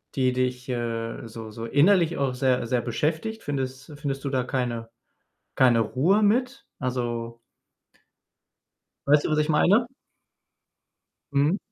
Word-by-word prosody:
Die 130 -2 +2
dich, 125 0 -2
äh, 115 -2 -3
so 115 0 -8
so 115 +2 -7
innerlich 170 - +3
auch 135 -2 0
sehr 125 -2 +1
sehr 120 +1 +1
beschäftigt? 160 - -2
Findest 135 +1 -4
findest 135 -2 -3
du 140 - -2
da 130 -2 0
keine 120 -3 -3 0.7
keine 125 -3 +5
Ruhe 150 - +2
mit? 250 +6 +1
Also 120 -2 -3 1.7
weißt 145 +1 +4
du, - - 0
was 155 - +2
ich 150 +1 0
meine? 200 +9 +4 1.5
Mhm. 145 +7 +3
130 Hz, 130 wpm, -25 LUFS, 120-150 Hz, 1.7 s, keine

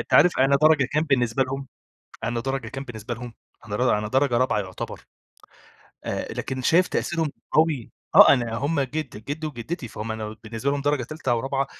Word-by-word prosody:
أنت - - -2
عارف 180 - +6
أنا 135 +1 +5
درجة 155 -3 +6
كام 155 +1 +2
بالنسبة 130 -4 +2
لهم، 135 +1 -4 0.6
أنا 115 0 -1
درجة 135 -2 -3
كام 135 +4 -6
بالنسبة 115 -1 -6
لهم؟ 120 0 -9 0.3
أنا 105 +1 +1
أنا 105 0 -3
درجة 130 0 +2
رابعة 130 -3 +2
يُعتبر 95 -2 -6 1.0
آآ، - - -3
لكن 130 -1 -4
شايف 175 +7 +4
تأثيرهم 165 -3 -1 0.2
قوي 155 -6 +2 0.2
آه، - - +10
أنا 120 -4 0
هم 145 +3 0
جد 135 -5 -4
جدي 155 +2 -4
وجدتي 130 +1 -5
فَهُم 110 0 -5
أنا 110 0 -5
بالنسبة 115 +4 -2
لهم 140 0 -1
درجة 145 -2 +1
تالتة 150 0 -4
أو 115 - +1
رابعة، 135 +1 -1
130 Hz, 185 wpm, -24 LUFS, 115-145 Hz, 1.0 s, آه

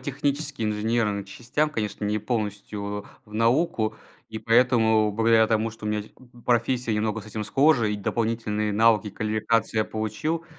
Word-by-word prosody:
технически, 145 0 -2
инженерным 105 -1 0
частям, 125 +9 -2
конечно, 105 -4 -3
не 105 +1 0
полностью 105 -2 -3
в 100 0 -4 0.3
в 105 - -12
науку. 115 -1 +1 0.3
И 110 - -6
поэтому, 115 -2 +3
благодаря 110 +1 +4
тому, 110 0 +1
что 110 -1 -9
у - - -1
меня 105 -1 -1
те - - -15
э - - -27
э 120 -1 -18
профессия 120 -1 +1
немного 110 +1 -1
с 105 - -13
этим 110 0 -4
схожа 135 +2 +3
и 105 0 -1
дополнительные 105 0 -1
навыки 110 0 +4
и - - -4
квалификации 110 +2 0
я 110 - +3
получил. 110 +10 -3
110 Hz, 175 wpm, -25 LUFS, 105-120 Hz, 0.3 s, благодаря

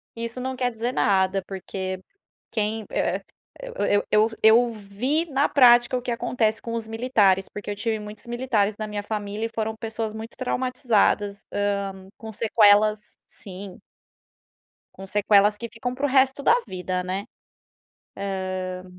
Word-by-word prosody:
Isso 235 +2 -5
não 260 +1 -3
quer 250 -1 0
dizer 230 +2 -2
nada, 195 -3 +2
porque 190 -1 -5 0.5
quem 220 0 -2
eh, - - 0 0.6
eu 205 - +2
eu 215 +1 +4
eu 230 +3 +6
vi 225 +10 -1
na 280 +1 +2
prática 240 -2 +6
o - - -4
que 245 - -3
acontece 225 -2 0
com 230 - -5
os 230 -1 -3
militares. 220 -5 +2
Porque 210 0 -7
eu - - -3
tive 220 +1 -2
muitos 210 +2 -9
militares 235 -4 0
na 215 - -4
minha 210 -1 -4
família 210 0 -3
e - - -3
foram 220 0 -2
pessoas 220 -1 -4
muito 220 +1 -8
traumatizadas, 240 -5 0
hã, 205 0 +1 0.4
com 220 -1 -9
sequelas 210 -1 +3
sim. 195 -2 -8 1.2
Com 195 - -10
sequelas 205 +1 +4
que 235 +2 -6
ficam 245 +2 -4
para 270 +3 -4
o - - +3
resto 265 +1 +3
da 370 - +5
vida, 185 0 -3
né. 185 +2 -3 1.3
Hã. 185 0 -5
220 Hz, 150 wpm, -24 LUFS, 205-240 Hz, 1.3 s, eu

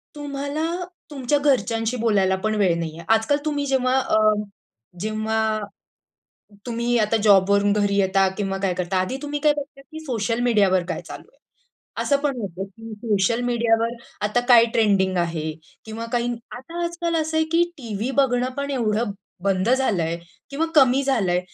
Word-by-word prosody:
तुम्हाला 290 +2 -3 0.4
तुमच्या 275 0 0
घरच्यांशी 235 -4 +1
बोलायला 200 -5 +2
पण 215 0 0
वेळ 190 -5 +2
नाहीये. 165 0 -5
आज-काल 225 +6 +3
तुम्ही 290 -2 -1
जेव्हा 260 -1 +1
अ, 255 - +1 0.8
जेव्हा, 215 +1 -1 1.1
तुम्ही 240 0 0
आता 215 0 +2
जॉबवरून 200 0 +4
घरी 205 -1 +1
येता 195 0 +3
किंवा 195 -2 -2
काय 190 -2 0
करता 180 +1 -2
आधी 185 +8 -1
तुम्ही 295 0 -3
काय 300 0 +4
बघता, 290 -1 -7
की 315 +4 -11
सोशल 235 -3 -1
मीडियावर 200 -6 +3
काय 170 - -3
चालू - - -10
आहे? - - -30 0.7
असं 280 - +2
पण 285 -3 0
होतं, 190 -2 -5
की 225 +4 -12
सोशल 210 +1 0
मीडियावर 230 -1 +1 0.3
आता 245 +3 +1
काय 235 -2 +8
ट्रेंडिंग 195 -4 +2
आहे? 165 -2 -1 0.3
किंवा 225 +1 -6
काही 240 0 0 0.2
आता 330 +8 -6
आज-काल 340 0 -2
असं 315 +1 -2
आहे, 315 - +3
की 335 +1 +4 0.2
टीव्ही 230 -1 -4
बघणं 250 -1 +1
पण 280 0 -3
एवढं 225 -4 0 0.3
बंद 195 +1 +1
झालंय 195 -11 +1 0.3
किंवा 295 +4 -1
कमी 270 -2 +5
झालंय 205 -10 +1
230 Hz, 155 wpm, -23 LUFS, 200-270 Hz, 1.1 s, काय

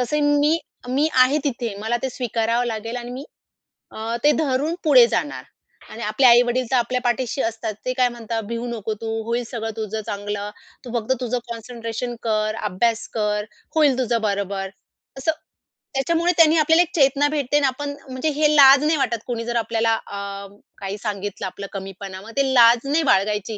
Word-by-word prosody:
तसे 295 +5 0
मी 290 +2 +3 0.3
मी 280 +5 +2
आहे 275 +4 +3
तिथे 235 -6 -2
मला 225 +2 0
ते 265 - -1
स्वीकारावं 235 -1 -1
लागेल 230 +1 -4
आणि 240 0 -6
मी 265 +3 -7 0.7
अ, 225 +2 -4
ते 295 - +6
धरून 285 +4 0
पुढे 260 -6 +7
जाणार 290 +4 -2 0.5
आणि 230 - -9
आपले 215 +5 +1
आई-वडील 245 +1 +4
तर - - +3
आपल्या 250 +1 0
पाठीशी 245 +2 -1
असतात. 225 -1 -3
ते 255 - 0
काय 250 -1 +2
म्हणतात 230 -1 -4
भिऊ 235 +1 -3
नको 220 -2 -3
तू 225 - -4 0.2
होईल 235 +2 -1
सगळं 225 -2 -3
तुझं 220 0 -3
चांगलं. 205 0 -4 0.4
तू 245 - -8
फक्त 225 +4 0
तुझं 250 0 -1
कॉन्सन्ट्रेशन 235 +1 -5
कर, 215 -1 0
अभ्यास 230 +4 0
कर, 210 -1 -1 0.3
होईल 290 -5 +4
तुझं 235 -2 0
बरोबर. 200 -2 -2 0.5
असं, 320 +4 +1 0.6
त्याच्यामुळे 335 +6 +1
त्यांनी 325 0 +6
आपल्याला 320 +2 +5
एक 340 - -9
चेतना 280 0 +3
भेटते 290 -1 0
आणि 290 - +2
आपण 285 +2 -3 0.2
म्हणजे 260 +5 -2
हे 305 -1 +4
लाज 275 0 +8
नाही 310 0 +2
वाटत 240 -4 0
कोणी 230 -2 -3
जर 240 0 -3
आपल्याला 225 0 +1
अ, 205 - -8 0.6
काही 195 +1 -5
सांगितलं 205 -2 -4
आपलं 200 +2 -7
कमीपणा. 190 0 -7
मग 225 +3 -11
ते 270 -1 +2
लाज 235 +1 +6
नाही 320 +2 +2
बाळगायची. 210 +2 0
235 Hz, 180 wpm, -22 LUFS, 220-270 Hz, 0.7 s, लाज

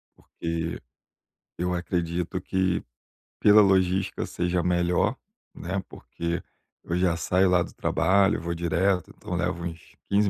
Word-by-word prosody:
porque 85 0 -4 0.8
eu 90 +1 -1
acredito 85 0 -2
que 95 -1 0 0.6
pela 105 +1 +7
logística 95 -1 +2
seja 90 0 -1
melhor, 90 0 +1 0.4
né, 95 +2 -3
porque 85 0 -4 0.4
eu 85 - -2
já 90 -2 +2
saio 90 +2 +2
lá 90 -1 +4
do - - -5
trabalho, 95 -1 +2
vou 85 0 -3
direto, 85 +3 0
então 90 - -5
levo 90 0 -1
uns 85 -1 -8
15 100 0 +3
90 Hz, 130 wpm, -26 LUFS, 85-95 Hz, 0.8 s, pela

